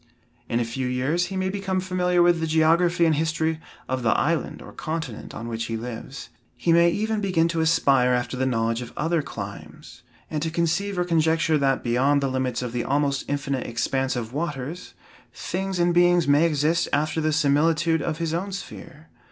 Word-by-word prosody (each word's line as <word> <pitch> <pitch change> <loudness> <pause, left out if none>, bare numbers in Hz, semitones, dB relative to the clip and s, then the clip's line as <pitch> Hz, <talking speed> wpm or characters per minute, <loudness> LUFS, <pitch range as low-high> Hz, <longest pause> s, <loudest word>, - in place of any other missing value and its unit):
In 115 - +1
a 120 - 0
few 125 +3 -3
years 140 +8 0
he 190 - -5
may 185 0 0
become 195 -1 -2
familiar 180 -1 +1
with 175 -1 +4
the 160 - -1
geography 170 +2 +3
and 160 - +3
history 160 +1 0 0.3
of 130 0 -2
the 115 - +1
island 165 +1 -1
or - - -11
continent 155 -7 -5
on 115 - -6
which 115 0 -3
he 115 - -3
lives. 120 +3 -7 0.3
He 165 +8 +2
may 170 +1 +5
even 215 +3 -1
begin 180 -5 +2
to 165 -1 -1
aspire 135 -6 +3
after 125 0 -1
the 130 +1 0
knowledge 115 -1 0
of 120 - -8
other 165 +2 +1
climes, 115 +3 -9 0.3
and 155 -2 -3
to 160 - -1
conceive 175 +4 -1
or 180 - +1
conjecture 160 -2 +2
that 135 -1 +1
beyond 130 +4 +2
the 135 - 0
limits 130 -1 -1
of 125 - -4
the 120 -1 -1
almost 140 0 0
infinite 140 -2 -2
expanse 130 +3 -1
of 120 -1 -4
waters, 150 +1 -5 0.4
things 190 +1 -3
and 175 0 +2
beings 175 -1 +4
may 145 +4 +5
exist 155 +2 +1
after 155 +2 0
the 155 0 +1
similitude 160 +2 +2
of 160 0 -2
his 165 -1 -2
own 190 +4 -2
sphere. 160 -5 -9
155 Hz, 195 wpm, -24 LUFS, 130-170 Hz, 0.4 s, may